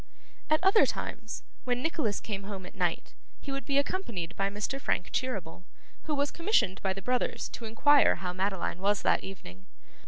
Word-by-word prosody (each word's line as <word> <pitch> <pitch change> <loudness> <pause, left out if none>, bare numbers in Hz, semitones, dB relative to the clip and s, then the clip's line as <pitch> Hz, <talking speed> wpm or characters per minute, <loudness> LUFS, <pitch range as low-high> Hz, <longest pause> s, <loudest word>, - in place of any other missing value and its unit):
At 310 0 +4
other 390 +3 +6
times, - - -4 0.2
when 250 0 0
Nicholas 300 -10 0
came 205 -3 -4
home 195 -2 -6
at - - -10
night, 175 -4 -1 0.3
he 280 - -6
would 275 0 -3
be 280 -1 +1
accompanied 235 - -1
by 195 0 +1
Mr. 215 +7 -3
Frank 180 - 0
Cheeryble, 200 -10 -3 0.4
who 305 - 0
was 285 0 +1
commissioned 335 - +1
by 190 - +1
the 195 0 -8
brothers 250 +2 0
to 235 - -7
inquire 280 +6 +5
how 180 0 -4
Madeline 190 -2 -1
was 200 +1 +1
that - - +3
evening. 95 - -10
210 Hz, 180 wpm, -30 LUFS, 190-275 Hz, 0.4 s, other